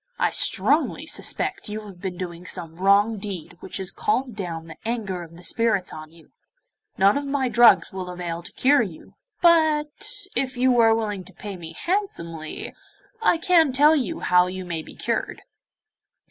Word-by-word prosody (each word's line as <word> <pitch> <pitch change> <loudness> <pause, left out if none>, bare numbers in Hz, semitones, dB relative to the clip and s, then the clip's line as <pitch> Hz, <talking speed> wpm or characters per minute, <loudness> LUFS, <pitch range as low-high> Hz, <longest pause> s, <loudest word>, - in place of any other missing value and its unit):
I - - +1
strongly - - +1
suspect - - -2
you 215 +1 -4
have 195 -4 -12
been 185 -2 -4
doing 175 -1 -7
some 165 -3 -3
wrong 200 +3 +3
deed 190 -4 -6
which - - -5
has 190 -1 -3
called 270 - -1
down 170 -5 -5
the 160 -1 -11
anger 215 -6 -3
of 170 -1 -11
the 175 - -14
spirits 220 -1 0
on 155 0 -9
you. 165 -1 -20 0.7
None 200 +8 +4
of 285 - -6
my 275 -2 0
drugs 240 -4 +5
will 185 -1 -5
avail 175 -1 -5
to 175 - -10
cure 280 0 +4
you, 190 -8 -7 0.3
but, 315 -3 +3 0.2
if 260 -1 -1
you 255 0 +3
are 225 -1 +6
willing 210 -4 -3
to - - -11
pay 205 -2 -7
me 165 -2 -9
handsomely, 170 - -4 0.5
I 400 - +4
can 330 -3 +4
tell 295 +4 +5
you 255 - -2
how 180 0 +4
you 185 0 -6
may 170 -2 -3
be - - -13
cured. - - -3
200 Hz, 175 wpm, -24 LUFS, 175-255 Hz, 0.7 s, are